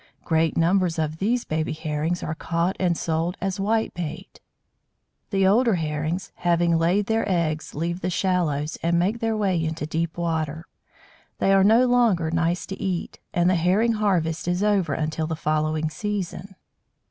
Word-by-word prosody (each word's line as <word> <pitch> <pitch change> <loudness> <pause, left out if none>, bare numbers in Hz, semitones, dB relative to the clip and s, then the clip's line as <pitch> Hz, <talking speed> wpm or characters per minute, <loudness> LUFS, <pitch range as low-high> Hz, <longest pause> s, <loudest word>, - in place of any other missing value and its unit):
Great 160 -1 +1
numbers 175 0 +2
of 155 0 -2
these 235 +5 0
baby 155 0 -2
Herrings 155 +2 -2
are 155 - -2
caught 170 +3 -1
and 175 -3 +1
sold 165 +3 -1
as 195 +1 -2
"Whitebait." 195 -4 -2 0.9
The 195 -2 +2
older 225 +3 +4
Herrings, 160 +2 -3
having 170 -1 +2
laid 175 +5 +2
their 225 +2 +1
eggs, 160 -4 -1
leave 170 +4 -2
the 180 - -1
shallows, 165 -5 0
and 170 +1 +1
make 195 +7 +1
their 225 -1 0
way 190 -5 +1
into 160 -1 -3
deep 160 +2 -2
water. 160 -2 -2 0.7
They 195 - +3
are 195 -1 +5
no 225 +5 +5
longer 230 -10 +2
nice 165 +1 0
to 195 - -7
eat, 185 -3 -3
and 175 0 +2
the 185 - +4
Herring 185 +7 +2
harvest 175 -7 0
is 180 +3 0
over 205 -4 +2
until 155 0 -2
the 160 - -2
following 155 0 0
season. 200 -1 -4
175 Hz, 160 wpm, -24 LUFS, 160-195 Hz, 0.9 s, are